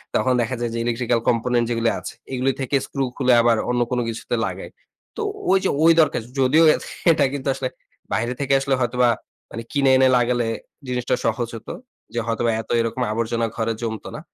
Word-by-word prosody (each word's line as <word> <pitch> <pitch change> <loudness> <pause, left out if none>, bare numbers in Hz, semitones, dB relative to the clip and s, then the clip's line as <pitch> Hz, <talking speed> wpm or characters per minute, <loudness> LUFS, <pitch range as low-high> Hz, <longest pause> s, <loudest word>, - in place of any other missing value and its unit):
তখন 130 - +2
দেখা 120 +2 -2
যায় 120 -1 -2
যে 115 - -3
ইলেকট্রিক্যাল 120 0 0
component 120 0 +1
যেগুলি 115 -1 +1
আছে - - -7 0.2
এগুলি 130 +1 +1
থেকে 135 +1 -1
স্ক্রু 135 -1 -3
খুলে 130 -2 +3
আবার 115 -1 +3
অন্য 125 0 +1
কোন 125 - +1
কিছুতে 115 - -3
লাগাই। - - -6 0.5
তো, - - -2 0.3
ওই 195 - +6
যে - - +2
ওই 165 - +7
দরকার 150 -6 +1 0.2
যদিও 135 +5 +5 0.5
এটা 150 -3 +3
কিন্তু 140 -1 -4
আসলে, 135 -1 -3 0.5
বাইরে 120 +3 0
থেকে 140 -1 0
আসলে 135 0 +1
হয়তোবা 125 0 +2 0.4
মানে 115 - -6
কিনে 140 -2 +2
এনে 130 0 +5
লাগালে 120 -1 +1 0.4
জিনিসটা 125 -1 0
সহজ 120 -2 0
হত। 115 - -10 0.4
যে 120 - -1
হয়তোবা 115 0 +1
এত 110 - -18
এরকম 115 +2 -3
আবর্জনা 115 +1 -1
ঘরে 115 0 -1
জমত 110 -2 -4
না। - - -6
120 Hz, 190 wpm, -22 LUFS, 115-130 Hz, 0.5 s, ওই